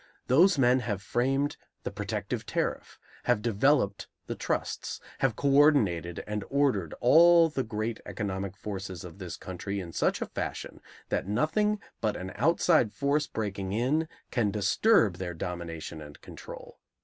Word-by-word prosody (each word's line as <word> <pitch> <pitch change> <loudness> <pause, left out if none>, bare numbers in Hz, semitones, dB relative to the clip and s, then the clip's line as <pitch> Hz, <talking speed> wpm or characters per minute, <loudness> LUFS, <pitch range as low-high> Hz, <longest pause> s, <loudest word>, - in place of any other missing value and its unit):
Those 170 +7 +5
men 130 -1 +4
have 105 -6 -2
framed 135 +4 0 0.3
the - - -3
protective - - -3
tariff, - - -2 0.3
have - - +3
developed 115 -2 +2 0.2
the - - -3
trusts, - - -3 0.2
have 135 -5 +1
co 140 +3 +1
ordinated 105 - +3
and 105 -1 -3
ordered 135 - +1
all 165 +5 +7
the 145 -3 -2
great 110 -1 -3
economic 100 -2 -4
forces 95 -4 -6
of 90 +2 -10
this 90 -3 -6
country 100 +2 -5
in 85 -3 -7
such - - +1
fashion - - -5 0.3
that - - -1
nothing 205 - +1 0.2
but 110 -2 0
an 95 0 -6
outside 155 -3 +3
force 145 +1 +1
breaking 100 -3 -3
in 135 +9 +1 0.2
can 115 -5 +1
disturb 105 - +3
their 90 -2 -5
domination 85 -2 -5
and 75 -1 -11
control. - - -11
110 Hz, 145 wpm, -29 LUFS, 95-140 Hz, 0.3 s, all